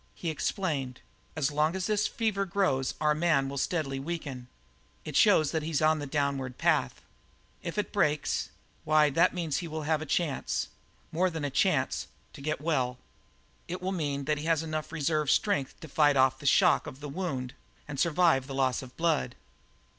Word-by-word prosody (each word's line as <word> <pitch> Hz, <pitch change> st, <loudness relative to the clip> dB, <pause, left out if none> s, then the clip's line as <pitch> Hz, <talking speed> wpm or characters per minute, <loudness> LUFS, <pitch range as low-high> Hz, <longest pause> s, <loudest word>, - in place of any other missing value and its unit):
He 170 Hz, -, -3 dB
explained: 145 Hz, -6 st, -2 dB, 0.4 s
"As 150 Hz, -3 st, 0 dB
long 155 Hz, +4 st, +1 dB
as 190 Hz, -1 st, -2 dB
this 210 Hz, 0 st, +1 dB
fever 215 Hz, -4 st, -1 dB
grows 175 Hz, -10 st, 0 dB
our 150 Hz, 0 st, +3 dB
man 155 Hz, -3 st, +2 dB
will 140 Hz, 0 st, -4 dB
steadily 135 Hz, -4 st, -1 dB
weaken; 140 Hz, -5 st, -5 dB, 0.6 s
it -, -, -6 dB
shows 155 Hz, -2 st, +5 dB
that 160 Hz, -, 0 dB
he's 155 Hz, -2 st, -1 dB
on 155 Hz, 0 st, +3 dB
the 145 Hz, -, -5 dB
downward 135 Hz, -3 st, -1 dB
path. -, -, +1 dB, 0.6 s
If 170 Hz, +2 st, -5 dB
it 210 Hz, -, -2 dB
breaks 150 Hz, -7 st, +1 dB, 0.3 s
why, 155 Hz, -1 st, +4 dB
that 165 Hz, +5 st, +3 dB
means 165 Hz, -5 st, -1 dB
that -, -, 0 dB
he 175 Hz, -, -5 dB
will 155 Hz, -1 st, -5 dB
have 155 Hz, 0 st, +1 dB
a 155 Hz, -, -5 dB
chance 155 Hz, -2 st, -1 dB, 0.4 s
more 185 Hz, +3 st, +2 dB
than 160 Hz, -4 st, -4 dB
a 140 Hz, -, -2 dB
chance -, -, +1 dB, 0.3 s
to -, -, -11 dB
get 155 Hz, +2 st, -2 dB
well. 130 Hz, -6 st, 0 dB, 0.7 s
It 180 Hz, +2 st, -4 dB
will 185 Hz, +1 st, -2 dB
mean 145 Hz, -6 st, -2 dB
that 150 Hz, 0 st, 0 dB
he 150 Hz, -, -5 dB
has 165 Hz, -1 st, +2 dB
enough 155 Hz, -1 st, -4 dB
reserve 155 Hz, -2 st, 0 dB
strength 195 Hz, -10 st, +1 dB
to 160 Hz, -, -8 dB
fight 145 Hz, -1 st, +3 dB
off 130 Hz, 0 st, +3 dB
the 145 Hz, -, -4 dB
shock -, -, +4 dB
of 130 Hz, -, -8 dB
the 145 Hz, -, -6 dB
wound 140 Hz, -6 st, -4 dB, 0.3 s
and 145 Hz, -2 st, -6 dB
survive 165 Hz, -5 st, +3 dB
the 135 Hz, -, -6 dB
loss 130 Hz, -2 st, +1 dB
of 130 Hz, -, -9 dB
the -, -, -28 dB
blood." 160 Hz, -7 st, 0 dB
155 Hz, 190 wpm, -29 LUFS, 140-165 Hz, 0.7 s, shows